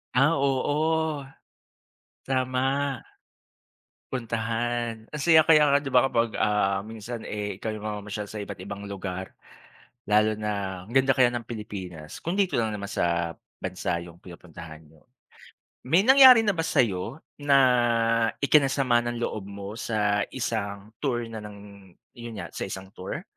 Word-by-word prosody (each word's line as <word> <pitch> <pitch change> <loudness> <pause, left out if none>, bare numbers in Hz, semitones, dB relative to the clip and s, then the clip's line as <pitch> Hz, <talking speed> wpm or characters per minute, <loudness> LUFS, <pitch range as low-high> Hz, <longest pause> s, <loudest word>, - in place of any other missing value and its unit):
Ah, 140 +5 +4
oo. 150 +2 0 1.0
Tama. 135 +1 0 1.1
Puntahan. 115 -1 -2
Ang 150 - -6
saya 160 +2 +6
kaya 155 -1 +5
nga 140 0 +3
di 140 - -5
ba, 125 0 +4
kapag, 115 -3 0
ah, 100 -1 +1
minsan, 110 +1 -7
eh, 105 -2 -4
ikaw 110 +1 -4
yung 110 - -7
mamamasyal 105 -1 -5
sa 110 - -7
iba't 100 -3 -6
ibang 100 +1 -7
lugar. 95 -2 -6 0.7
Lalo 105 +1 +3
na 100 -3 -3
ang 115 - -12
ganda 135 0 +4
kaya 125 -2 +4
ng 120 - -2
Pilipinas. 95 -9 -8
Kung 175 +4 -2
dito 195 -3 +1
lang 115 -2 +1
naman 100 -1 -5
sa 85 -3 -1 0.2
bansa 90 -2 -3
yung 85 +1 -15
pinupuntahan 80 -3 -12
niyo. 75 0 -22 0.9
May 170 +8 +4
nangyari 260 -1 +9
na 210 - +3
ba 165 -4 -2
sa'yo 115 - 0 0.2
na 145 -1 +3 0.9
ikinasama 135 -4 +3
ng 120 0 -3
loob 100 -3 -4
mo 100 0 -7
sa 105 -3 0 0.2
isang 105 -4 -3
tour 120 -5 -1
na 110 - -6
ng 100 -2 -12 0.2
yun 120 -2 -9
nga, - - -9
sa - - -5
isang 95 0 -8
tour? 95 -3 -6
110 Hz, 145 wpm, -26 LUFS, 100-135 Hz, 1.1 s, nangyari